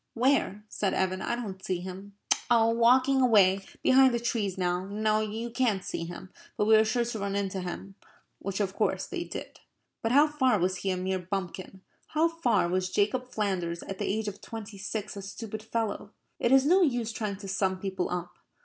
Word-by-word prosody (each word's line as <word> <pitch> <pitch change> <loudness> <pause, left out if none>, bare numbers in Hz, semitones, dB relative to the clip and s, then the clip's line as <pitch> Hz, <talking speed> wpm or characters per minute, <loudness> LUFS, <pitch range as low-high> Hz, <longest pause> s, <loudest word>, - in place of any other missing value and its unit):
"Where?" 240 -5 +2
said 200 -2 -1
Evan. 185 0 0
"I 235 - -1
don't 195 -6 -6
see 185 -2 -1
him." 190 +2 -8 0.3
"Oh, 230 -2 +5
walking 255 +3 +4
away 200 -6 +5 0.2
behind 260 -1 +6
the - - 0
trees 220 -5 -1
now. 180 0 -1
No, 215 +1 +1
you 220 +2 -3
can't 225 -6 +1
see 165 - -4
him. 175 +2 -9 0.3
But 210 - +2
we 220 +1 +6
are 215 - +6
sure 235 +2 0
to 230 -2 -4
run 200 0 -2
into 195 -1 -2
him," 180 +2 -6 0.5
which, 195 0 -4
of 195 -2 0
course, - - 0
they - - -4
did. - - -8 0.4
But 225 - 0
how 285 +4 +7
far 265 -6 +2
was 185 0 0
he 195 - -2
a 185 - 0
mere 185 +1 -1
bumpkin? 185 +1 -5 0.3
How 315 +2 +2
far 330 - +1
was 185 +1 0
Jacob 230 +7 0
Flanders 180 -5 -2
at 195 - -7
the - - -1
age 215 +1 -2
of 205 0 -6
twenty 220 -3 -8
six 210 +1 -4
a 200 - -6
stupid 215 +2 -7
fellow? 220 -2 -3 0.3
It 235 - +1
is 270 0 +6
no 365 +6 +5
use 245 -8 +1
trying 210 -3 -3
to 200 0 -9
sum 190 -1 0
people 190 -2 -2
up. 175 0 -5
205 Hz, 205 wpm, -28 LUFS, 190-235 Hz, 0.5 s, how